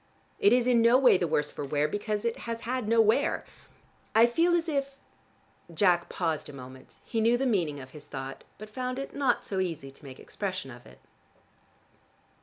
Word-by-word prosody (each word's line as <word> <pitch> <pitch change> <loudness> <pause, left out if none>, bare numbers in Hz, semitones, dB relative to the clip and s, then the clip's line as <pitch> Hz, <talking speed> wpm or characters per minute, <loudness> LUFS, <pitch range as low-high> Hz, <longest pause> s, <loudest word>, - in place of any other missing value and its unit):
It 405 - +5
is 245 -1 +4
in 245 -2 +4
no 235 +2 +6
way 255 -8 +5
the 175 - 0
worse 150 -1 0
for - - -6
wear, 145 +1 0
because 205 +5 -3
it 235 - 0
has 230 0 -4
had 250 -1 -3
no 230 +1 +3
wear. 225 +7 +2 0.7
I 225 +1 +8
feel 335 +9 +2
as 340 -1 0
if 275 -3 -2 0.4
" - - -25
Jack 175 -2 +3
paused 160 -4 -2
a - - -10
moment: 130 -1 -12
he 225 -2 -1
knew 230 +2 +3
the 270 - -1
meaning 170 - 0
of 130 -1 -11
his 150 -1 -12
thought, 135 -1 -7
but 215 - -9
found 250 +4 -4
it 275 - -6
not 270 -4 +1
so 195 - -3
easy 165 -7 -3
to 135 - -16
make 135 -2 -11
expression 185 -8 -5
of 120 +1 -13
it. - - -17
210 Hz, 205 wpm, -28 LUFS, 150-245 Hz, 0.7 s, I